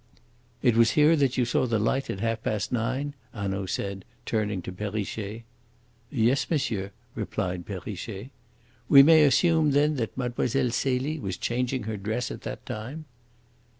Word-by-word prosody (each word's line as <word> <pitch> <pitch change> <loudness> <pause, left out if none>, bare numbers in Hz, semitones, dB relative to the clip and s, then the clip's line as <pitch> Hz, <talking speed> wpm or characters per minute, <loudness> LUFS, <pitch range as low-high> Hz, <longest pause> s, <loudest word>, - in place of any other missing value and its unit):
"It 120 -4 +4
was 115 -1 +5
here 150 +2 +6
that 135 -2 +1
you 125 - +3
saw 120 +2 +1
the 115 -2 +1
light 125 +6 0
at 95 - -4
half 115 0 -1
past 105 -4 -2
nine?" 130 +4 -1 0.2
Hanaud 100 -2 -2
said, 100 0 -3 0.2
turning 105 -4 -1
to 90 - -5
Perrichet. 105 +2 -4 0.7
"Yes, 130 +1 +1
monsieur," 115 - -1 0.2
replied 90 -5 -3
Perrichet. 100 +4 -6 0.6
"We 140 -1 +10
may 160 +1 +7
assume, 160 +1 +4
then, 150 +1 +3
that 115 -1 -3
Mlle. 125 -2 -1 0.2
Celie 135 +5 0
was 95 -6 -4
changing 125 +1 -1
her 110 0 -4
dress 110 +5 -2
at - - -7
that - - -7
time." 130 +9 -6
115 Hz, 150 wpm, -27 LUFS, 105-135 Hz, 0.7 s, We